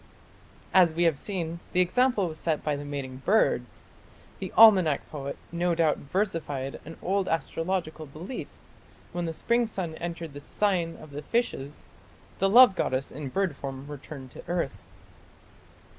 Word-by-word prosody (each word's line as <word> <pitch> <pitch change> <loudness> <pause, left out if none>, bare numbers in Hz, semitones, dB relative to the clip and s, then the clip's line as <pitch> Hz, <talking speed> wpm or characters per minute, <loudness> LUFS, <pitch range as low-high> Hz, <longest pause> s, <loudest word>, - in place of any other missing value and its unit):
As 175 -4 +6
we 170 +2 +1
have 160 -5 +3
seen, 170 -4 -3
the 180 - +2
example 215 +2 +3
was 155 -2 -7
set 160 -1 -1
by 150 -1 0
the 145 - -5
mating 140 -3 -5
birds. 200 +11 +1 0.5
The - - -5
"Almanack" 185 -10 +7
poet 140 -2 -5
no 170 0 +1
doubt 160 -2 +3
versified 145 -6 -2
an 165 - -9
old 195 +1 +1
astrological 165 -1 -2
belief: 165 - -7 0.6
when 175 -1 -2
the 165 - -3
spring 235 +5 +1
sun 185 -6 -4
entered 170 -2 -5
the 145 - -7
sign 175 0 0
of 155 - -12
the 145 +1 -6
Fishes, 150 - -2 0.5
the 195 - +3
love 240 -1 +8
goddess 130 -5 -1
in 140 -1 -6
bird 190 0 0
form 135 -1 -6
returned 140 -2 -9
to - - -11
earth. 170 - -2
165 Hz, 155 wpm, -27 LUFS, 145-190 Hz, 0.6 s, love